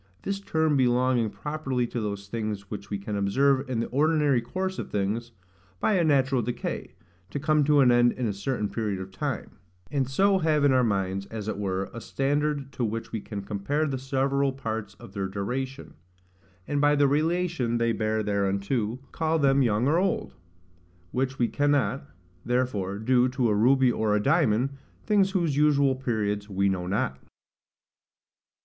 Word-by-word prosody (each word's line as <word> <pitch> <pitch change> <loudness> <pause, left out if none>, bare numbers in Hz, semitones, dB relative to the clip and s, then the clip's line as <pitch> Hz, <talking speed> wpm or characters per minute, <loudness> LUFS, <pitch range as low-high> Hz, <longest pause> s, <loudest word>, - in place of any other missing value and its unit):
This 195 0 -2
term 160 -5 +1
belonging 125 -2 +2
properly 135 -2 -2
to 120 0 -4
those 100 -1 -4
things 105 -2 -4
which 100 -2 -6
we 100 - -2
can 100 +1 -5
observe 130 +7 +2
in 120 -3 0
the - - -2
ordinary 145 -2 +2
course 185 +10 -3
of - - -5
things, 105 +4 -2 0.5
by 215 - +2
a 180 -3 +3
natural 135 -4 +3
decay, 120 +1 -4 0.3
to 100 - -4
come 155 0 +2
to 145 -1 +5
an 125 -2 +6
end 120 0 +4
in 125 - -3
a 105 - 0
certain 105 +2 -2
period 105 -3 -3
of 95 0 -7
time; 140 -1 -4 0.3
and 135 -3 0
so 195 +8 +3
have 155 -3 +2
in 140 -2 +5
our 130 -1 +4
minds, 100 -3 -1
as 110 -2 -6
it 110 - -3
were, 95 -1 -2
a 115 - -7
standard 145 +1 -1
to 125 - -3
which 115 0 -3
we 110 - -3
can 100 -2 -6
compare 105 +11 -1
the 135 -3 -2
several 135 +1 0
parts 110 -5 -5
of 95 - -13
their 100 -2 -2
duration; 125 +8 -4 0.7
and, 145 -1 0
by 145 0 +4
the 145 -1 +4
relation 155 -4 0
they 115 0 +1
bear 110 0 0
thereunto, 100 +3 -1
call 160 0 0
them 140 -2 +3
young 115 0 +2
or 160 +4 +3
old; 190 0 -1 0.8
which 130 +1 -1
we 120 - +2
cannot, 145 -1 0 0.3
therefore, 120 -6 -1
do 125 +3 +3
to 125 -2 0
a - - +3
ruby 130 +4 +4
or 110 -2 +1
a - - +2
diamond, 135 -2 +2 0.3
things 205 -3 +3
whose 170 -7 0
usual 145 -2 +4
periods 105 -5 -2
we 100 0 +1
know 90 -2 -2
not. 80 -9 -1
125 Hz, 175 wpm, -26 LUFS, 105-145 Hz, 0.8 s, an